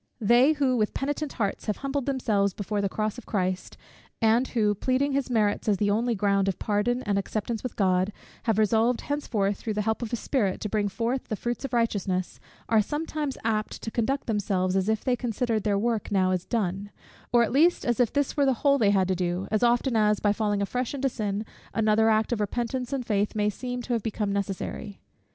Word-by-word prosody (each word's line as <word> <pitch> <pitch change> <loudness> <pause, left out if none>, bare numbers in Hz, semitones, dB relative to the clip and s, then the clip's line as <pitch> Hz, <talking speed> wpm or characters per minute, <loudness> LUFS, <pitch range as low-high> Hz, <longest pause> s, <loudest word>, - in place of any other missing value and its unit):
They 240 +7 +5
who, 270 -4 +1
with 215 -2 0
penitent 290 +1 -2
hearts, 200 -5 -2
have 210 - 0
humbled 275 -1 -3
themselves 210 -8 +1
before 205 0 -2
the 200 - 0
cross 215 +4 -2
of 245 - -16
Christ; 185 -2 -2 0.4
and 230 +3 +3
who, 210 -4 +1
pleading 260 +7 0
his 275 -1 -1
merits 215 -3 +1
as 205 - +3
their 205 0 +2
only 235 +2 +1
ground 200 -1 +2
of 195 - 0
pardon 240 +4 0
and 200 -1 +1
acceptance 215 +3 -3
with 255 - -5
God, 185 0 +2 0.3
have 225 -3 +2
resolved 225 +3 +2
henceforth, 210 -9 -1
through 215 -2 -4
the 210 - 0
help 220 +2 -1
of 235 - -3
his 240 - -2
Spirit, 205 -9 0
to 210 - -3
bring 210 0 0
forth 235 +6 -2
the 215 - -2
fruits 240 +5 -3
of - - -5
righteousness, 200 -6 -1 0.3
are 220 -1 +4
sometimes 295 +3 -3
apt 215 -1 -1
to 225 - -4
conduct 265 +5 -1
themselves 195 -4 0
as 195 +2 +1
if 220 -1 0
they 255 -2 +2
considered 235 -2 -1
their 200 0 +1
work 225 +1 0
as - - -11
now 185 -2 +3
done; 200 -3 -1 0.4
or 240 -1 +5
at 230 - -1
least 325 +6 +3
as 240 -2 0
if 245 -3 +3
this 285 -1 0
were 285 -2 +3
the 265 - +4
whole 280 0 +5
they 210 -4 +4
had 195 -2 +3
to 190 - +1
do, 180 +1 -2
as 215 - +1
often 240 +1 +2
as, 210 -1 +3
by 205 -1 +2
falling 205 -2 0
afresh 250 +6 -2
into 270 0 0
sin, 210 -3 -3 0.3
another 220 0 +3
act 220 +1 +2
of 240 - 0
repentance 240 +4 -2
and 270 -3 -2
faith 210 -1 0
may 210 0 +1
seem 245 +2 -5
to 245 - -2
have 230 - 0
become 210 -1 -2
necessary. 200 +1 -4
220 Hz, 220 wpm, -26 LUFS, 205-245 Hz, 0.4 s, They